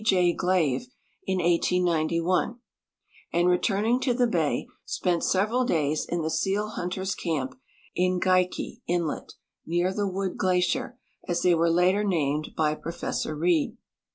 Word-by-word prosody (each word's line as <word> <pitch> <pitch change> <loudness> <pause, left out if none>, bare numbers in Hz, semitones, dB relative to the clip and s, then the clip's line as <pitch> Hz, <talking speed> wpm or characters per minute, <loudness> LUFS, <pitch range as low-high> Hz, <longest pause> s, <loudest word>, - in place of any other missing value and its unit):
J. 180 -4 +3
Glave 180 - +1 0.4
in 190 -1 +1
1891, 175 +3 +1 0.7
and 175 +1 +3
returning 205 +6 +2
to 255 -2 0
the 245 0 +3
ba}'' 170 -10 0 0.2
spent 175 -2 -1
several 215 +7 +2
days, 155 - 0
in 170 -1 -1
the 160 - -1
seal 195 +6 0
hunters' 190 0 -3
camp 140 -7 -2 0.4
in 180 0 +1
Geikie 185 0 0
inlet 170 -3 -2 0.3
near 175 +3 0
the 205 0 -1
Wood 190 0 -3
glacier, 185 +8 +1 0.3
as 175 -1 -1
they 180 - +5
were 165 0 +3
later 180 +4 +3
named 155 -6 -1
by 150 -1 +2
Professor 165 -1 -4
Reid. 165 0 +1
180 Hz, 135 wpm, -26 LUFS, 165-190 Hz, 0.7 s, they